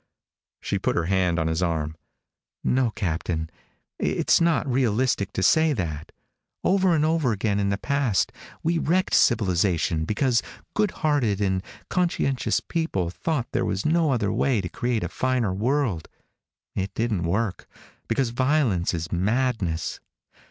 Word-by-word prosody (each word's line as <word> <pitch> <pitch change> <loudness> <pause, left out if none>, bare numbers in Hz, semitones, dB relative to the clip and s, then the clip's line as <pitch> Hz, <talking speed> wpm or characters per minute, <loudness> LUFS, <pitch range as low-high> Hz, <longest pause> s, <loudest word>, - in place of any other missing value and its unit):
She - - -2
put - - 0
her 85 - +1
hand 90 -1 +1
on 80 - 0
his 80 +2 0
arm. 80 -3 -1 0.7
"No, 130 -1 +2
Captain. 85 -5 -3 0.5
It's - - +2
not 170 -2 +2
realistic 125 -5 +1
to 95 - -1
say 160 +5 +4
that. 80 - -4 0.5
Over 190 -2 +3
and 155 -1 +2
over 160 -5 +2
again 105 -1 0
in 100 -1 +1
the 100 - 0
past 140 -3 0 0.3
we 165 +1 +1
wrecked 185 +5 +1
civilization 90 -6 +2
because 120 - +1 0.3
good 210 -1 +2 0.2
hearted 125 -10 +2
and 95 -2 +1 0.3
conscientious 170 -7 +1
people 100 - -2
thought 145 - -2
there - - 0
was 95 - -2
no 160 0 +3
other 105 -6 0
way 130 -5 +2
to 90 -2 -3
create 120 +2 -1
a - - -1
finer 125 -6 0
world. 115 - 0 0.7
It 95 0 -2
didn't 110 -5 0
work, 100 +4 -1 0.4
because 115 +1 0
violence 125 - +1
is 80 0 -4
madness. 100 -3 0
110 Hz, 145 wpm, -25 LUFS, 90-135 Hz, 0.7 s, say